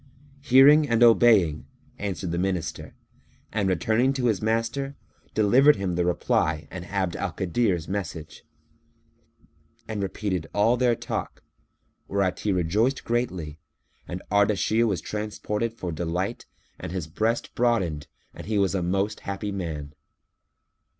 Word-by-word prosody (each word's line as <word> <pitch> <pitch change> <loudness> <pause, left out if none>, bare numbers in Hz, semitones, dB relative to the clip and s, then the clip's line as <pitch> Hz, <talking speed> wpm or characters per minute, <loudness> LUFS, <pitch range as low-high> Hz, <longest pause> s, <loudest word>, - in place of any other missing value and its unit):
"Hearing 145 +2 +6
and 115 0 +3
obeying," 110 -9 +5 0.3
answered 95 -4 -3
the 85 - -1
Minister; 90 -2 -3 0.6
and, 100 -2 0
returning 110 +9 +2
to 130 -2 -2
his 110 -6 +1
master, 115 +6 -1 0.4
delivered 130 +8 +5
him 95 -2 -2
the 90 0 +1
reply 80 -2 0
and 90 -2 -7
Abd 95 -2 -2
al 100 -4 -3
Kadir's 90 -1 0
message, 90 -5 -5 1.4
and 110 -2 -3
repeated 95 -3 -3
all 110 +4 +4
their 125 -1 +2
talk, - - -5 0.6
whereat 95 -2 0
he 105 - -1
rejoiced 100 +9 +1
greatly 90 -11 -2 0.5
and 90 +1 -6
Ardashir 105 +3 +2
was 95 -7 -1
transported 105 +1 -3
for 95 -6 -6
delight 85 +3 -3 0.3
and - - -6
his 90 -4 -3
breast 110 +9 -2
broadened 95 -12 0 0.3
and - - -10
he 110 -1 0
was 100 -2 +2
a 95 - 0
most 95 +4 -1
happy 100 +1 -4
man. 80 -7 -5
100 Hz, 130 wpm, -25 LUFS, 90-115 Hz, 1.4 s, Hearing